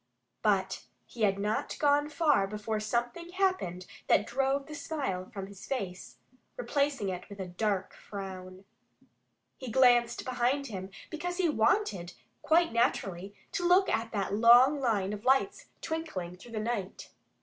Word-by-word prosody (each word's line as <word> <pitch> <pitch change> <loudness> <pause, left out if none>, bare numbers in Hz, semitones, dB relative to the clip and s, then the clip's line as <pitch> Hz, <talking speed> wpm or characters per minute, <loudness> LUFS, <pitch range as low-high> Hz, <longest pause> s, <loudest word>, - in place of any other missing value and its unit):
But 195 -3 +1 0.2
he 235 - -11
had 195 -2 +3
not 210 +2 -2
gone 290 0 +3
far 300 -10 +2
before 210 +1 -3
something 240 +11 -3
happened 370 - 0 0.2
that 205 - +4
drove 270 +3 0
the 305 - -9
smile 270 -12 -3
from 195 -5 -6
his 195 -1 -12
face, 195 -9 -5 0.4
replacing 275 -3 0
it 180 -1 -6
with 200 -1 -10
a 190 - -3
dark 190 +1 -2
frown. 190 -1 -8 0.9
He 260 - -7
had 225 - -5
glanced 245 -2 +4
behind 255 +3 0
him, 190 -6 -6 0.2
because 355 +3 -4
he 360 -3 +2
wanted 220 - +1 0.3
quite 335 -3 +3
naturally 195 -4 0 0.2
to 350 - 0
look 370 +2 +5
at 225 +1 -1
that 200 -2 -2
long 240 +6 +6
line 210 -6 0
of 210 0 -7
lights 270 +10 +2 0.2
twinkling 250 - -4
through 230 +6 -14
the 220 - -2
night. 215 -4 -4
230 Hz, 150 wpm, -30 LUFS, 195-280 Hz, 0.9 s, long